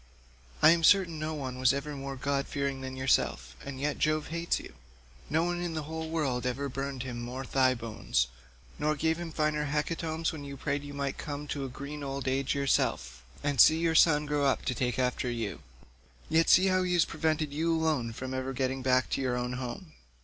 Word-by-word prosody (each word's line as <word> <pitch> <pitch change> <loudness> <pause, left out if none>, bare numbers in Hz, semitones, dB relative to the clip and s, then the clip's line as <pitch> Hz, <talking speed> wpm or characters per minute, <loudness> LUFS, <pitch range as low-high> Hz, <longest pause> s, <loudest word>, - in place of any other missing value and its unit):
I - - +9
am 170 0 +2
certain 170 -3 +5
no 155 +1 -3
one 130 -3 -5
was 130 0 +4
ever 145 +1 -4
more 135 0 -5
god 140 +1 -1
fearing 140 -1 -2
than 130 0 -5
yourself, 70 - +1
and 140 -2 -6
yet 150 +2 -1
Jove 155 0 +1
hates 170 +1 -1
you. - - -11 0.6
No 160 +3 +2
one 175 0 -1
in 175 -2 -3
the 155 - -2
whole 160 +1 -5
world 140 -7 -1
ever 140 +3 -2
burned 135 0 -4
him 120 -2 -5
more 125 +2 -5
thigh 130 -1 +3
bones, 95 - -1 0.5
nor 150 +1 +1
gave 160 +3 0
him 170 -1 -5
finer 150 -1 0
hecatombs 160 +2 -1
when 155 -3 -7
you 140 -1 -7
prayed 140 +1 -2
you 145 0 -8
might 140 -1 -3
come 145 0 -5
to 140 -1 -2
a - - -5
green 140 +4 -7
old 135 0 -4
age 135 +1 0
yourself 65 - 0 0.2
and 145 -3 +4
see 160 - +7
your 165 0 +1
son 150 -2 +5
grow 145 -1 0
up 135 - 0
to 130 - 0
take 125 +1 -1
after 125 0 0
you: 115 -4 -3 0.7
yet 165 +1 +3
see 185 - +7
how 185 -1 +3
he 180 -1 0
has 175 -2 +4
prevented 155 -2 -1
you 165 +3 +1
alone 155 -8 +1
from 130 +3 -6
ever 130 0 -3
getting 130 +1 -1
back 130 0 +3
to - - 0
your 125 -2 0
own 125 0 -2
home. 130 +8 -6
140 Hz, 215 wpm, -30 LUFS, 130-155 Hz, 0.7 s, I